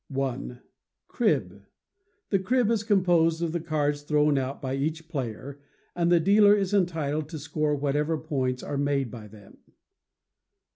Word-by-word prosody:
i. 130 -2 -3 0.5
Crib. - - 0 0.7
The 195 - +3
crib 230 +4 +1
is 225 -3 +1
composed 175 -6 +2
of 165 - -1
the 170 - -2
cards 150 -3 -1
thrown 150 0 +2
out 135 0 -2
by 130 -2 -4
each 155 +4 -3
player, 135 - -6 0.3
and 170 0 +1
the 175 - +5
dealer 205 +4 +5
is 195 -1 -1
entitled 155 -6 0
to 160 - -6
score 150 0 -1
whatever 145 +3 0
points 130 -5 -2
are 145 - -4
made 140 -4 0
by 110 -2 -9
them. 105 -1 -16
150 Hz, 150 wpm, -26 LUFS, 140-170 Hz, 0.7 s, the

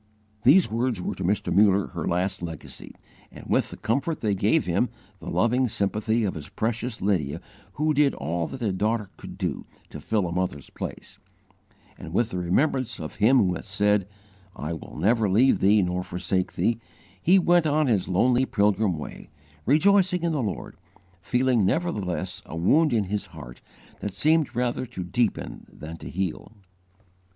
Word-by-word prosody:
These 155 - +6
words 115 -1 0
were - - -3
to 95 - -6
Mr. 100 +3 0
Muller 100 -1 +4
her 85 - -4
last 90 +2 -1
legacy; 80 -3 -8 0.4
and - - -12
with - - +1
the - - -9
comfort 140 +7 -1
they 105 -2 +1
gave 95 - +2
him, - - +1 0.3
the - - -7
loving 125 +3 +2
sympathy 110 +2 0
of 100 - 0
his 75 -2 -8
precious 115 0 -3
Lydia 85 -9 0 0.3
who 155 +5 +1
did 145 -1 +3
all 80 +3 -2
that 130 -2 -7
a 105 - +1
daughter 105 +1 -1
could - - -10
do - - -3 0.2
to - - -7
fill 105 -4 0
a 85 - -3
mother's 90 -6 -3
place, - - -8 0.8
and 80 - -8
with 120 -1 +1
the 90 - -2
remembrance 120 - 0
of 80 -2 -7
Him 115 +6 +5
who 90 -6 +3
hath - - -6
said, 105 -1 +1 0.5
'I 75 +3 -4
will 80 - -9
never 105 +5 +2
leave 120 +8 +4
thee 100 +1 +4
nor 90 0 -1
forsake 90 +1 -2
thee,' 115 -1 0 0.4
he 185 +4 +5
went 175 -3 +4
on 150 +1 +2
his 110 -8 +1
lonely 125 +8 +2
pilgrim 105 -3 +1
way, 75 - -9 0.4
rejoicing 180 +4 +4
in 170 - +1
the 150 -4 0
Lord, 105 -6 -4 0.4
feeling 125 +3 +2
nevertheless 95 - -1
a 80 - -7
wound 145 - +3
in 110 -3 +2
his 100 +2 -3
heart, - - -11 0.4
that 105 - -5
seemed 155 -3 +2
rather 125 +1 -1
to 115 -6 -6
deepen 105 +4 -2
than 80 +2 -9
to - - -9
heal. 95 +3 -4
105 Hz, 175 wpm, -25 LUFS, 90-130 Hz, 0.8 s, These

